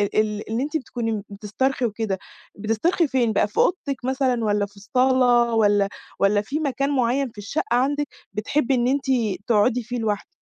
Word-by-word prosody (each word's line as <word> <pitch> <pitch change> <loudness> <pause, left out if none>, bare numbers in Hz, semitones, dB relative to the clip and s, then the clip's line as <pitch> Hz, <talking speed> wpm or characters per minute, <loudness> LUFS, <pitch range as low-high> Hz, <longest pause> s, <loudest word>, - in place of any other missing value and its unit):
ال 215 -1 0
اللي 230 +4 -1
أنتِ 300 +2 -1
بتكوني 225 -7 -3
بتسترخي 220 +6 -1
وكده، 215 -3 -2 0.4
بتسترخي 225 - +1
فين 245 -5 +1
بقى؟ 205 - +2
في 210 - -17
أوضتِك 280 -8 0
مثلًا، 260 -2 +1
والّا 205 -1 +1
في 200 +1 -18
الصالة، 245 +1 +3
والّا 205 -2 +3 0.3
والّا 205 +1 +3
في 275 +9 -3
مكان 275 -2 -1
معيّن 265 0 +1
في 225 - -24
الشقة 205 +10 -2
عندِك، 285 +4 +1 0.3
بتحبي 265 +5 0
إن 240 -1 +1
أنتِ 275 +1 0 0.4
تقعدي 240 +2 +3
فيه 245 +2 -4
لوحدِك؟ 210 -3 -2
240 Hz, 165 wpm, -23 LUFS, 210-265 Hz, 0.4 s, الصالة